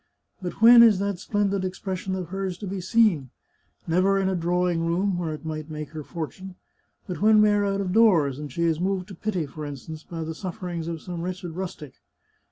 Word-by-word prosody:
But 180 +4 -5
when 235 +1 +10
is 225 -4 +7
that 200 -1 -2
splendid 200 -1 0
expres 185 0 -4
sion 190 0 -3
of 180 -2 -5
hers 190 -1 -3
to 205 - -7
be 190 0 -4
seen? 185 - +2 0.6
Never 185 +4 +2
in 190 -1 +1
a 190 - 0
drawing 175 0 0
room, 180 +4 0
where 165 -3 -2
it 155 +1 -7
might 155 -1 -5
make 150 -2 -6
her 155 -1 -6
fortune, 180 +5 -7 0.5
but 180 -1 -6
when 215 0 +6
we 210 0 +6
are 205 0 +2
out 200 0 0
of 185 -2 -2
doors, 170 - +4
and 150 -2 -6
she 170 +6 -2
is 165 -2 +1
moved 185 0 -1
to - - -8
pity, 185 -3 -2
for 150 +2 -8
instance, 150 +2 -7
by 165 0 -6
the 160 +1 -4
sufferings 175 -2 -5
of 165 -2 -5
some 175 -2 -5
wretched 180 0 -5
rustic. 175 -5 -7
180 Hz, 215 wpm, -25 LUFS, 165-195 Hz, 0.6 s, when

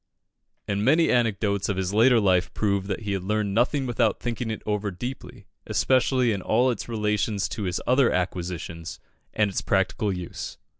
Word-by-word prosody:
And 100 0 -1
many 155 +7 +4
anecdotes 105 -4 +1
of 100 - -1
his 95 +1 -2
later 115 +3 +5
life 95 -3 +2
prove 100 -2 0
that 100 +2 -3
he 100 -2 -2
learned 100 +1 -1
nothing 130 +5 +1
without 120 -2 +1
thinking 120 -1 -3
it 110 - -5
over 105 -1 -1
deeply, 125 +8 -7 0.2
especially 130 -2 +2
in 100 -3 -2
all 125 +7 +2
its 120 - -5
relations 105 -2 0
to 110 -4 -4
his 90 -1 -1
other 130 0 +4
acquisitions 85 -2 -4 0.3
and 110 - +2
its - - -2
practical 100 +2 0
use. 90 -2 -6
105 Hz, 165 wpm, -25 LUFS, 95-120 Hz, 0.3 s, later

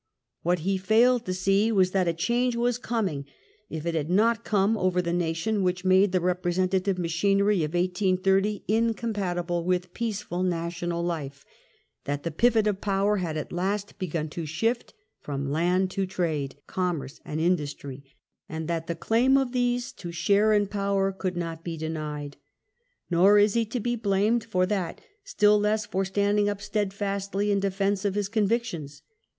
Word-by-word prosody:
What 175 0 +1
he 190 +3 0
failed 235 +5 +3
to 185 - 0
see 195 +4 +2
was 190 -4 +3
that 185 -2 +1
a 170 - +2
change 240 +8 0
was 240 0 0
coming, 195 - -2 0.4
if 160 0 -5
it 170 - -1
had 155 -1 -2
not 225 +5 +3
come, 205 +1 +2
over 185 -3 +1
the 170 -1 -1
nation, 175 +5 0
which 180 0 -1
made 190 +1 +5
the 185 - +2
representative 185 +2 0
machinery 195 +3 +2
of 155 +3 -3
1830 190 +3 +1
in 225 +2 +2
compatible 175 -7 -2
with 180 0 -1
peaceful 210 -5 -3
national 170 -1 -2
life; 145 -5 -4 0.6
that 145 0 -3
the 170 - -2
pivot 225 +5 +3
of 205 -2 0
power 200 +1 +1
had 165 -4 -2
at 155 - -5
least 195 +3 -2
begun 165 -4 -2
to 160 +1 -5
shift 225 - -1 0.2
from 140 -1 -4
land 180 +4 +1
to 195 0 -1
trade, 160 -7 -2
commerce, 165 -7 -3
and 150 - -4
industry, 145 -5 -2 0.5
and 160 0 -4
that 165 -1 -2
the 170 - -2
claim 240 +10 +3
of 265 -2 0
these 245 +1 0
to 175 -9 -8
share 200 +6 +3
in 205 -1 +3
power 200 -1 0
could 185 -2 -4
not 165 -1 -4
be 165 -2 -4
denied. 155 -2 -5 0.7
Nor 190 +4 +6
is 205 0 +4
he 230 -1 +2
to 245 - -3
be 240 +2 -1
blamed 215 +1 +1
for 185 -5 +1
that, 185 -4 -2 0.2
still 210 - +3
less 210 +1 +1
for 195 0 -1
standing 205 +1 +1
up 205 -1 -3
steadfastly 200 -1 -2
in 200 - +2
defence 195 0 0
of 200 -1 0
his 205 -1 -1
convictions. 205 - -1
190 Hz, 170 wpm, -26 LUFS, 170-210 Hz, 0.7 s, Nor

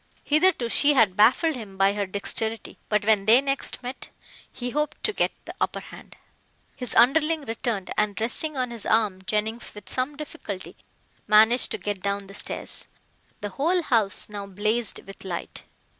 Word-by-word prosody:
Hitherto 305 -4 +3
she 285 +5 +3
had 215 -7 +4
baffled 265 - +4
him 205 -6 -9
by 195 +1 +4
her 205 -1 -2
dexterity, 220 +3 -3
but 210 -1 +1
when 210 -2 +3
they 225 +4 +7
next 275 -1 -2
met 250 +2 -6 0.4
he 245 0 -5
hoped 300 +2 -2
to 425 - 0
get - - +1
the - - -7
upper - - 0
hand. - - -13 0.6
His 250 - -4
underling 305 +5 +4
returned 225 -5 -3
and, 210 0 0
resting 270 +6 +1
on 250 -2 -1
his 230 -3 -5
arm, 210 -4 +2
Jennings 220 +2 -2
with 210 - -11
some 260 +3 -2
difficulty 205 -10 -7 0.5
managed 220 +3 +5
to - - -2
get 205 -2 -4
down 200 0 -2
the 195 - -12
stairs. - - -2 0.5
The 205 - -3
whole 335 - 0
house 220 -8 +1
now 205 -1 -7
blazed 215 +4 -1
with 195 - -11
light. 180 -3 -6
225 Hz, 170 wpm, -25 LUFS, 205-265 Hz, 0.6 s, they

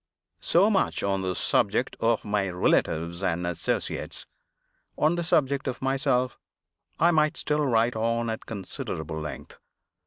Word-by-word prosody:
So 195 +6 +4
much 195 - +1
on 95 -1 0
the 95 -1 -2
subject - - +1
of 115 -1 +1
my 100 -2 0
relatives 85 -1 +1
and 90 -2 0
associates. 85 -2 -2 0.7
On 155 +2 +3
the 175 0 -1
subject 140 -4 +1
of 130 - -3
myself, 130 -1 0 0.6
I 170 +2 +5
might 155 -1 +2
still 150 0 0
write 115 -1 +2
on 115 +1 0
at 110 - -6
considerable 85 -6 -5
length. 75 -1 -7
115 Hz, 135 wpm, -27 LUFS, 95-140 Hz, 0.7 s, I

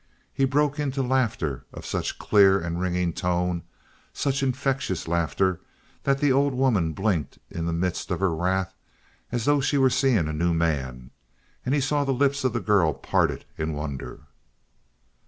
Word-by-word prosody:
He 135 - +2
broke 145 +2 +1
into 135 -2 -1
laughter 115 - 0
of - - -10
such - - -3
clear 100 -2 +5
and 85 0 -3
ringing 90 -2 0
tone 90 -1 -1 0.5
such 140 0 -1
infectious 135 - -1
laughter 85 +2 0 0.4
that 135 0 +3
the 145 -1 +2
old 140 0 +2
woman 110 -12 +2
blinked 95 -4 -1
in 85 0 -3
the - - 0
midst 85 +2 -2
of - - -1
her 95 -3 +1
wrath 95 +3 0 0.6
as 120 -2 -1
though 145 -1 +3
she 145 +1 +1
were 130 -1 +4
seeing 130 - +2
a 80 - -3
new 85 +2 +1
man, 65 -7 -2 0.5
and 130 +3 +1
he 145 - +2
saw 145 +2 +1
the 135 -1 0
lips 140 +1 +1
of 130 - +2
the 120 - 0
girl 95 -7 +2
parted 70 - 0
in 80 0 -1
wonder. 75 -1 -5
95 Hz, 170 wpm, -25 LUFS, 85-135 Hz, 0.6 s, clear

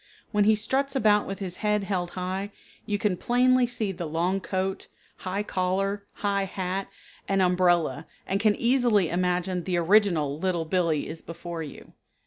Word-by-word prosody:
When 210 -2 +3
he 215 +1 +5
struts 265 +6 0
about 210 -4 +3
with 195 - -4
his 185 -2 -5
head 210 -1 +1
held 185 -3 -2
high 190 +3 -3 0.4
you 205 - 0
can 205 -4 0
plainly 250 +3 +3
see 230 -4 -2
the 175 -3 -5
long 175 +5 0
coat, 190 0 -2 0.3
high 190 +2 -3
collar, 195 +1 -1 0.2
high 200 -1 +1
hat, 190 0 -3 0.4
and 195 0 +1
umbrella 175 -5 +2 0.2
and 195 - -1
can 210 0 +3
easily 235 -7 +3
imagine 180 0 0
the 180 -1 -1
original 170 -6 +3
Little 175 -2 0
Billee 165 -3 +1
is 160 +1 -7
before 170 0 -7
you. 150 -3 -10
190 Hz, 160 wpm, -26 LUFS, 175-210 Hz, 0.4 s, he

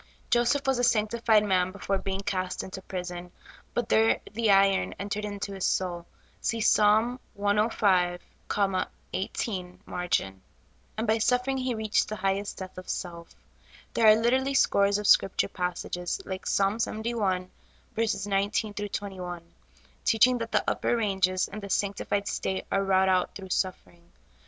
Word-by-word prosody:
Joseph 240 +4 +2
was 265 -2 +1
a - - +1
sanctified 225 -1 +3
man 185 -2 +1
before 195 0 -2
being 195 0 -3
cast 185 -2 -2
into 190 0 -7
prison; 180 -1 -6 0.4
but 240 -2 0
there 225 -1 +3
the 225 0 +1
iron 195 -1 +4
entered 205 +1 -3
into 200 -1 -5
his 190 -1 -5
soul 175 -2 -1 0.3
(see 230 - -1
Ps. 220 - +4
105, 210 -4 +2 0.9
18 185 -1 -3
margin), 95 - -2 0.6
and 220 - -1
by 220 0 +2
suffering 250 +4 +1
he 255 -2 -1
reached 215 -1 +1
the 215 - -3
highest 195 +1 -2
death 185 -1 -7
of 185 - -11
self. 170 -2 -5 0.6
There 225 - +4
are 215 - +9
literally 260 +5 +1
scores 200 -5 +3
of 210 - -4
Scripture 195 - +4
passages, 180 -1 -3
hke 190 -1 -6
Ps. 200 +3 +1
71: 210 -5 -2 0.7
19 205 +2 0
21, 190 -4 -5 0.6
teaching 245 +3 +4
that 230 0 -4
the - - +2
upper 240 - +1
ranges 190 -4 +1
in 210 - -7
the 200 -1 -8
sanctified 200 0 -1
state 190 0 -2
are 195 - +2
wrought 190 -1 +3
out 185 -1 +1
through 190 -2 -8
suffering. 175 -2 -3
200 Hz, 145 wpm, -27 LUFS, 185-220 Hz, 0.9 s, are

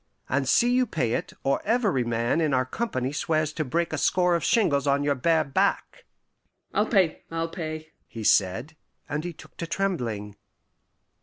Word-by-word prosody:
And 135 0 0
see 240 +10 +4
you 255 0 +3
pay 125 - -1
it, - - -2
or 135 0 +1
every 210 - +1
man 120 +6 0
in 150 -4 +2
our 130 0 +2
company 130 - -2
swears 155 0 0
to 155 - -2
break 165 +5 -1
a 155 - -1
score 180 +2 +2
of 170 - 0
shingles 145 - +2
on 140 +1 +2
your 145 0 +2
bare 160 +4 +2
back." 190 +8 -1 0.7
"I'll 210 - +2
pay, 185 -7 +2
I'll 165 0 -2
pay," 155 -2 -6 0.2
he 115 - -8
said, 110 +10 +2 0.3
and 150 +1 -3
he 175 - -4
took 165 - -15
to 170 - -4
trembling. 120 - -2
155 Hz, 175 wpm, -26 LUFS, 130-175 Hz, 0.7 s, see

